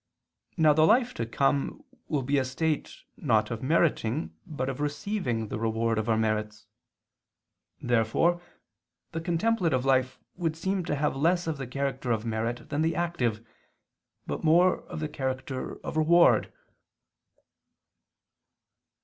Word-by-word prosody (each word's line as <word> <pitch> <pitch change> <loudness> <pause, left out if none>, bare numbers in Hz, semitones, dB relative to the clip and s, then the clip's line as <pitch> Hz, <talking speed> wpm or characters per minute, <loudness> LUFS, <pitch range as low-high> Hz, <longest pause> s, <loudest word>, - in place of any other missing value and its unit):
Now 155 -2 +5
the 155 +1 +4
life 245 +4 +3
to 115 - -3
come 140 - 0 0.2
will 145 -4 -1
be 140 +2 +1
a - - +1
state 150 +4 -2
not 110 -5 +1
of 115 - -4
meriting 150 -2 +1
but 145 -6 -3
of 135 0 -4
receiving 145 - -2
the - - -4
reward 115 0 0
of 110 +1 -2
our 110 - +3
merits. 110 -1 -1 1.1
Therefore 120 +9 +2 0.7
the 165 - -4
contemplative 170 - +1
life 130 -1 +2 0.2
would 165 -3 -1
seem 190 +2 -1
to 150 - -1
have 145 -1 0
less 175 +5 +2
of 160 -3 -3
the 135 - -4
character 135 -1 -2
of 110 0 0
merit 115 +1 -3
than 145 +1 -1
the 160 +1 +1
active, 125 -11 -1 0.8
but - - -4
more 175 +3 +4
of 155 - -7
the 155 - -1
character 130 -2 -4
of - - -4
reward. 170 +2 +4
140 Hz, 140 wpm, -28 LUFS, 115-165 Hz, 1.1 s, Now